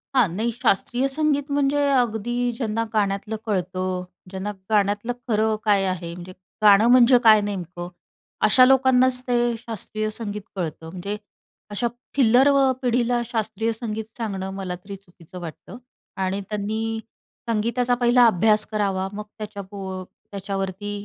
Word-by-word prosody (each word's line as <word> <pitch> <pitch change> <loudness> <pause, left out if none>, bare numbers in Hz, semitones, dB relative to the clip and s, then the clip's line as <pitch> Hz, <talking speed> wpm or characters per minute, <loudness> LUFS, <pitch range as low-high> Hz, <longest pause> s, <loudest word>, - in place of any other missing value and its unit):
हां. 250 -5 +5
नाही 230 +3 0
शास्त्रीय 245 +2 +1
संगीत 285 0 0
म्हणजे 285 0 +2
अगदी 240 -1 0
ज्यांना 230 -2 -1
गाण्यातलं 205 +1 0
कळतं, 185 -2 -2 0.3
ज्यांना 190 +2 -4 0.2
गाण्यातलं 205 +2 +1
खरं 220 -1 +2
काय 205 -2 +4
आहे? 175 -2 -3
म्हणजे 180 +1 -9 0.3
गाणं 210 +2 +7
म्हणजे 250 0 +7
काय 215 -2 +7
नेमकं? 180 -3 -5 0.6
अशा 255 +4 +7
लोकांनाच 260 -1 +4
ते 240 -1 +2
शास्त्रीय 215 -1 -4
संगीत 210 -2 -5
कळतं. 160 -3 -5
म्हणजे 195 +4 -5 0.5
अशा 210 +4 -1 0.3
थिल्लरव 265 +3 +5 0.2
पिढीला 245 -1 +1
शास्त्रीय 225 -1 -2
संगीत 220 -1 -4
सांगणं, 195 -4 -3
मला 190 -2 -4
तरी 195 +3 -9
चुकीचं 180 -2 -14
वाटतं 170 +7 -9 0.4
आणि 190 +1 -1
त्यांनी 220 +2 -2 0.5
संगीताचा 235 +3 +1
पहिला 245 0 +4
अभ्यास 215 +1 +3
करावा, 195 -3 0
मग 210 +1 -5
त्याच्याप 205 -2 -8
अ, 190 -1 -5 0.3
त्याच्यावरती 195 0 -4
215 Hz, 130 wpm, -23 LUFS, 195-240 Hz, 0.6 s, गाणं